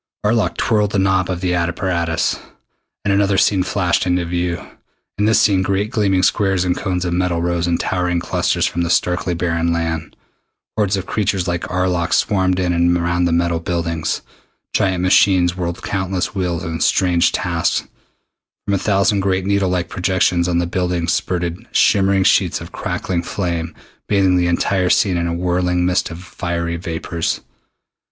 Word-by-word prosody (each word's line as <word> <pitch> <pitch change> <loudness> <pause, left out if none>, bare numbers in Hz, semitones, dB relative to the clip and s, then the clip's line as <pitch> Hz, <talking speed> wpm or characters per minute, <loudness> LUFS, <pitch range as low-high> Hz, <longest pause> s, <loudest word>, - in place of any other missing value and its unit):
Arlok 110 +1 +1
twirled 105 -3 +1
the - - +1
knob 95 -1 +2
of 90 -1 -3
the 90 -1 0
apparatus, 85 -1 -1 0.7
and 100 - +2
another 100 0 +2
scene 95 -1 +3
flashed 90 -1 0
into 90 -1 +1
view. 85 0 -2 0.6
In 105 - +2
this 110 +1 +4
scene 100 -3 +3
great 100 +3 -1
gleaming 100 -5 +1
squares 95 -4 +2
and 90 -1 +1
cones 90 -3 -2
of 85 - -1
metal 90 -1 0
rose 85 0 -1
in 85 -1 +1
towering 90 -1 -1
clusters - - 0
from 85 - -1
the 85 - -1
starkly 90 0 +1
barren 85 -1 0
land. 80 -2 -3 0.6
Hordes 105 -2 +1
of 95 - -4
creatures 95 -4 -1
like 85 -1 -2
Arlok 90 -1 0
swarmed 95 -3 +1
in 90 -1 +1
and 85 +1 +2
around 85 +1 0
the 85 - +1
metal 85 0 +1
buildings. 85 -1 -2 0.5
Giant 95 -2 +1
machines 90 -1 +4
whirled 85 -2 -4
countless 95 -2 -2
wheels 90 -4 -2
in 80 0 -4
strange 90 -3 +2
tasks. - - -1 0.8
From 100 - -1
a 100 - +1
thousand 100 +1 +2
great 95 -1 0
needle 100 -1 +1
like 90 -1 -1
projections 90 -2 +1
on 85 -1 +1
the 85 - +1
buildings 90 -1 -1
spurted 85 -1 -2
shimmering 95 -1 +3
sheets - - +2
of - - -10
crackling 90 -2 -3
flame, 85 -3 -3 0.3
bathing 95 -2 +3
the 90 -1 +2
entire 90 +1 +1
scene 95 -1 +3
in 85 0 -1
a 85 - -2
whirling 90 0 0
mist 90 +1 +1
of 85 +2 -9
fiery 85 -1 -3
vapors. 85 0 -3
90 Hz, 170 wpm, -19 LUFS, 85-95 Hz, 0.8 s, this